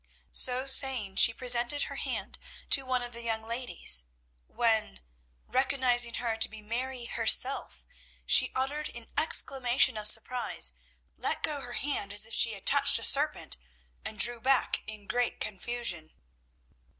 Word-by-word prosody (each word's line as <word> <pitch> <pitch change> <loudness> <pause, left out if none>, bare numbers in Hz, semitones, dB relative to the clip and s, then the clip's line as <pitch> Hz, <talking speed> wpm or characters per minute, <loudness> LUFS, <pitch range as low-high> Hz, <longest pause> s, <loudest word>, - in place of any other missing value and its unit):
So 255 +1 +4
saying, 260 -8 +2
she 230 - +6
presented 245 +4 +1
her - - -7
hand - - -5 0.3
to 270 -2 +4
one 255 -1 -1
of 240 - -8
the 235 0 -9
young 225 -1 -3
ladies, 230 - 0 0.4
when, 220 - -1 0.5
recognising 255 -3 0
her 230 -2 -4
to - - +1
be 220 - -10
Mary 240 +3 -5
herself, - - +2 0.4
she - - +7
uttered 285 +4 -3
an 235 -1 -12
exclamation 260 -5 +2
of 210 0 -1
surprise, 240 +3 +1 0.4
let - - -4
go 300 -3 -3
her 245 -2 -10
hand 240 -7 -5
as 205 +1 -1
if 225 - -14
she 230 +1 +2
had 195 - -12
touched - - +4
a - - -5
serpent, - - +1 0.5
and 215 - -7
drew 235 +3 +3
back 265 0 0
in 215 -2 -9
great 245 +3 -3
confusion. 195 -5 -4
240 Hz, 150 wpm, -28 LUFS, 220-260 Hz, 0.5 s, she